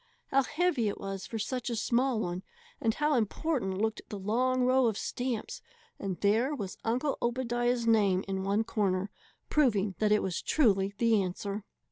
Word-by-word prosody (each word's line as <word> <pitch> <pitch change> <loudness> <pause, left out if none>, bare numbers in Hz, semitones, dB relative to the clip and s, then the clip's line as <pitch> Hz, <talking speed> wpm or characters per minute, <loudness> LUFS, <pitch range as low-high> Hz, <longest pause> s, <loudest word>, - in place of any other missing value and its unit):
How 275 - +4
heavy 300 -5 +1
it 200 - -3
was 195 -1 -5
for 225 - -4
such 250 +4 -3
a 235 - -1
small 240 +2 +1
one, 175 -3 -2 0.4
and 225 -1 +1
how 300 0 +1
important 235 -3 0
looked 220 +2 -1
the 205 - -5
long 250 +6 +1
row 255 0 +4
of 220 -2 -1
stamps; 250 - -3 0.4
and 190 -4 -4
there 225 +8 +2
was 200 -8 -6
Uncle 255 +5 0
Obadiah's 240 0 0
name 200 -5 +3
in 190 -1 -2
one 200 +3 +1
corner, 195 -3 -1 0.4
proving 215 -10 +2
that 215 -1 +2
it 210 - +4
was 185 -3 -2
truly 200 -8 +2
the 225 -2 +3
answer! 200 +3 -4
225 Hz, 170 wpm, -30 LUFS, 200-255 Hz, 0.4 s, How